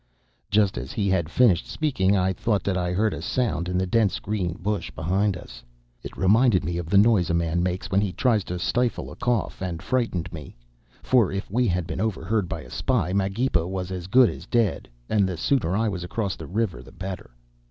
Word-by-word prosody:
"Just 100 -8 +2
as 65 +4 -7
he 100 -2 0
had 85 -4 +1
finished 100 -5 +3
speaking 100 -11 +1
I 95 0 +1
thought 105 -1 0
that 100 - 0
I 90 -1 -1
heard 105 +4 +1
a - - -5
sound 90 - -1
in 90 - 0
the 95 - +1
dense 105 +1 +2
green 95 -5 -2
bush 100 +4 -3
behind 95 +4 0
us. - - -11 0.4
It - - -9
reminded 105 +1 +4
me 85 +1 -2
of 85 -2 -6
the 100 - +4
noise 105 -3 +4
a 85 - +1
man 85 0 0
makes 90 +1 -2
when 100 +1 +3
he 100 -3 -1
tries 110 -1 +1
to 90 - -4
stifle 120 +8 -1
a - - -9
cough, 120 -7 -1
and 90 -3 -3
frightened 95 -8 -1
me. 75 -4 -9 0.5
For 120 -7 +3
if 95 -1 -4
we 125 +3 +2
had 90 -2 0
been 85 +2 -4
overheard 105 -2 -1
by - - -4
a - - -13
spy, 105 -9 0
Magepa 100 -2 +1
was 95 -1 -4
as 90 -1 -5
good 125 +4 +5
as - - -10
dead, 115 -4 0 0.2
and 100 -3 +2
the 90 - -4
sooner 95 - +1
I 115 +1 +1
was 95 -4 -3
across 95 +1 -2
the - - -9
river 95 - -2
the 65 - -14
better. 95 -2 -7
95 Hz, 215 wpm, -25 LUFS, 90-110 Hz, 0.5 s, good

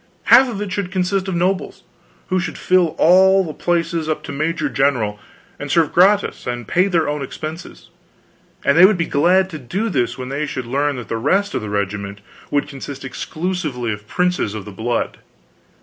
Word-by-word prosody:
Half 255 +2 +6
of 215 -4 -5
it 200 - -6
should 185 -1 -3
consist 190 +1 0
of 190 - -2
nobles, 180 +2 -1 0.5
who 185 0 +1
should 170 - -4
fill 180 -3 +2
all 190 +3 +5
the 160 -4 -6
places 165 -2 -1
up 155 - -2
to - - -7
Major 155 +1 -1
General, 125 -7 0 0.4
and 145 - -6
serve 160 0 +2
gratis 195 -1 +3
and 120 -2 -4
pay 180 +3 +2
their 170 -5 +1
own 150 0 -2
expenses; 155 +5 -8 0.7
and 140 - +4
they 175 +3 +8
would 205 -2 +1
be 165 - 0
glad 180 +6 +3
to 155 - -6
do 195 - -3
this 125 - -1
when 130 0 -6
they 145 +2 -2
should 130 -3 -4
learn 140 +4 0
that 120 -4 -7
the 115 - -2
rest 195 - +1
of - - -1
the 105 - -6
regiment 100 0 -3 0.3
would 145 0 0
consist 140 -1 -8
exclusively 150 - -3
of 105 +1 -10
princes 180 - 0
of 105 - -6
the 105 - -8
blood. 115 +4 -2
155 Hz, 195 wpm, -19 LUFS, 125-185 Hz, 0.7 s, they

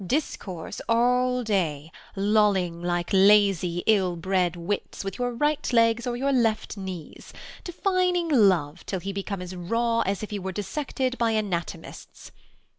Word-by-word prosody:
Discourse 190 - -3
all 250 +2 +2
day, 165 -8 -1 0.2
lolling 195 -4 +2
like 175 0 -2
lazy 195 -3 +4
ill 190 -5 +3
Bred 180 0 0
wits, 175 +5 -4
with 195 +5 -6
your 245 0 0
right 295 +3 0
legs 230 0 +3
o'er 240 - -1
your 275 +3 0
left 225 -5 +1
knees: 190 -5 -8 0.3
Defining 360 -1 0
love, 185 - +2
till 190 - -2
he 195 +2 -5
become 195 -1 -4
as 180 +1 -8
raw 230 +6 0
As 200 -2 -1
if 215 - -6
he 205 - -3
were 190 0 -5
dissected 255 - -3
by 230 -1 +2
anatomists. 195 -6 -5
205 Hz, 145 wpm, -25 LUFS, 180-240 Hz, 0.3 s, lazy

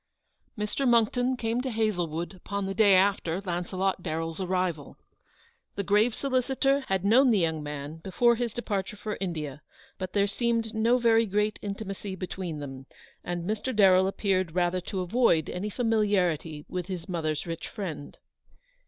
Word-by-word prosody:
Mr. 210 +6 -1
Moxcktox 245 +2 +3
came 230 +1 -1
to 260 - -3
Hazlewood 175 -7 -1
upon 200 +2 -4
the 195 - -2
day 205 -2 +5
after 185 -3 +2
Launcelot 185 +1 -2
Darren's 165 +1 -3
arrival. 180 -5 -2 0.8
The 200 - -2
grave 210 +4 +3
solicitor 270 +1 +1
had 190 0 0
known 250 +6 +6
the 225 - +4
young 160 -4 0
man 150 +1 -6
before 235 +8 +2
his 240 0 -2
departure 205 -3 -3
for 210 +1 -4
India, 155 -6 -4 0.4
but 185 -1 -5
there 200 -1 +3
seemed 230 +1 -1
no 230 +3 +3
very 230 -2 +4
great 210 +2 0
intimacy 200 -1 -5
between 180 -3 -5
them, 135 -2 -8 0.4
and 175 0 -4
Mr. 220 +4 -2
Darrell 190 -2 +6
appeared 185 -4 0
rather 180 0 +1
to 185 +1 -4
avoid 180 -4 +2
any 190 +4 -3
familiarity 195 - 0
with 180 -1 -4
his 185 -4 -5
mother's 155 -4 -2
rich 165 -1 -5
friend. 160 -9 -6
195 Hz, 155 wpm, -28 LUFS, 175-220 Hz, 0.8 s, known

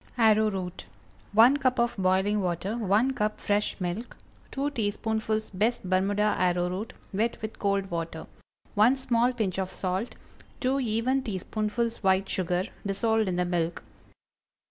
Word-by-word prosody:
ARROWROOT. 215 -5 +2
✠ - - -8 0.5
1 235 +6 +7
cup 255 -2 +1
of 235 0 +1
boiling 190 +2 +2
water. 185 +4 -2
1 220 +3 +2
cup 215 -3 -1
fresh 205 +1 0
milk. 185 +6 -4 0.3
2 285 +1 -2
teaspoonfuls 220 -1 -1
best 210 +1 0
Bermuda 200 +3 +2
arrowroot, 180 +3 0 0.2
wet 225 +4 0
with 220 - -5
cold 200 -2 0
water. 165 -1 -4 0.5
1 220 +6 +5
small 245 -2 +2
pinch 210 -7 -2
of 190 -1 -1
salt. 190 +4 -3 0.5
2 265 +1 +1
even 250 +2 +1
teaspoonfuls 215 +1 -2
white 190 -1 +2
sugar, 180 -1 0 0.2
dissolved 220 +2 +1
in 180 - -1
the 180 0 +1
milk. 175 -1 -1
210 Hz, 140 wpm, -27 LUFS, 185-230 Hz, 0.5 s, 1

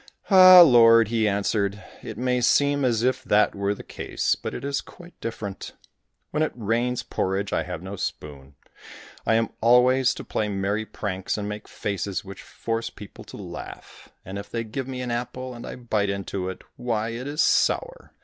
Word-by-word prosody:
"Ah! 185 -1 +10
Lord," 115 -7 +7
he 110 -2 +1
answered, 100 0 -1 0.2
"it 110 - -8
may 125 +1 0
seem 145 +3 +3
as 120 -3 +1
if 130 +1 +1
that 105 -3 +3
were 100 +1 -1
the - - -10
case, - - -2
but - - -5
it - - -6
is 140 0 -1
quite 175 0 -15
different. 105 -4 -6 0.6
When 150 - -1
it 155 - +1
rains 120 +2 -1
porridge 95 +1 -2
I - - +1
have 85 - -6
no 95 +2 -6
spoon. 70 -6 -6 0.7
I 110 - +4
am 115 0 +1
always 125 +2 +4
to - - -7
play 105 - -2
merry 100 +2 -2
pranks, 95 -2 -4
and 105 -1 -3
make 105 0 -6
faces 100 0 -4
which 95 -1 -9
force 115 0 -4
people 105 - -12
to - - -11
laugh, - - -10 0.2
and 95 +2 -6
if 100 - -9
they 115 -1 -3
give 125 +4 -5
me 130 -1 -5
an 125 -1 -3
apple, 125 +2 -4
and 120 - -9
I - - -6
bite 110 -5 -1
into 100 -1 -3
it, 95 - -8
why 115 -2 -2
it 120 +3 -5
is 150 +2 +1
sour! - - +1
115 Hz, 190 wpm, -24 LUFS, 100-125 Hz, 0.7 s, Ah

